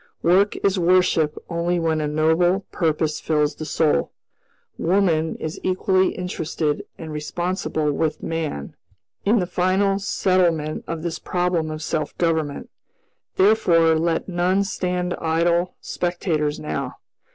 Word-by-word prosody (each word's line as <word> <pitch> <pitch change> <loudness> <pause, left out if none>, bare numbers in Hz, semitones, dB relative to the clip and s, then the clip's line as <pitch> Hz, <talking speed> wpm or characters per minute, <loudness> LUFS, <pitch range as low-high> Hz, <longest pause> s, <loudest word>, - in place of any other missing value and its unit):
Work 190 +4 +4
is 195 -1 +2
worship 170 -3 +3
only 170 +1 0
when 160 -2 0
a 150 - -1
noble 160 +5 +2
purpose 155 -2 0
fills 150 -2 +1
the 155 - -7
soul. 155 0 +1 0.7
Woman 165 -3 +2
is 155 - -5
equally 185 0 +2
interested 160 -4 -2
and 160 -1 -7
responsible 155 0 -2
with 155 +1 -1
man 160 - -3 0.5
in 215 +4 +4
the 185 - +1
final 190 +2 +1
settlement 175 -6 +1
of 165 -1 -4
this 170 -2 -3
problem 175 -3 -1
of 155 0 -5
self 155 -1 -3
government; 160 -4 -1 0.6
therefore 175 -5 +4
let 165 +1 0
none 185 +2 +1
stand 180 -2 -2
idle 170 +2 +1
spectators 165 -4 -1
now. 75 0 -4
170 Hz, 125 wpm, -22 LUFS, 155-180 Hz, 0.7 s, Work